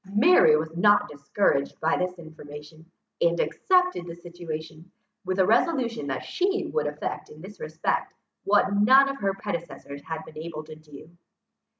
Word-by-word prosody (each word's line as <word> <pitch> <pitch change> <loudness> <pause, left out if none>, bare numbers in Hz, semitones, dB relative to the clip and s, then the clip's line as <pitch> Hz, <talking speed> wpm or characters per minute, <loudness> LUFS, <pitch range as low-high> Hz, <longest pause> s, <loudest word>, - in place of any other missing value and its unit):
Mary 215 - +6
was 160 +1 -4
not 205 +3 +4
discouraged 140 0 -1
by 160 +1 +1
this 180 0 -2
information, 155 -1 -12 0.4
and - - +2
accepted 365 - +1
the 170 - -7
situation, 170 -1 -8 0.4
with 185 +1 -2
a 190 - +4
resolution 235 - +1
that 135 - -3
she 390 +2 -1
would 470 - 0
effect - - -5
in 450 - -14
this - - -12
respect, 470 - -2 0.3
what 205 0 +3
none 260 +7 +6
of 275 0 -4
her 195 -1 -1
predecessors 170 -7 -6
had 160 +1 -6
been 155 - -11
able 155 -1 -6
to 155 0 -11
do. 155 -1 -14
175 Hz, 160 wpm, -26 LUFS, 155-230 Hz, 0.4 s, Mary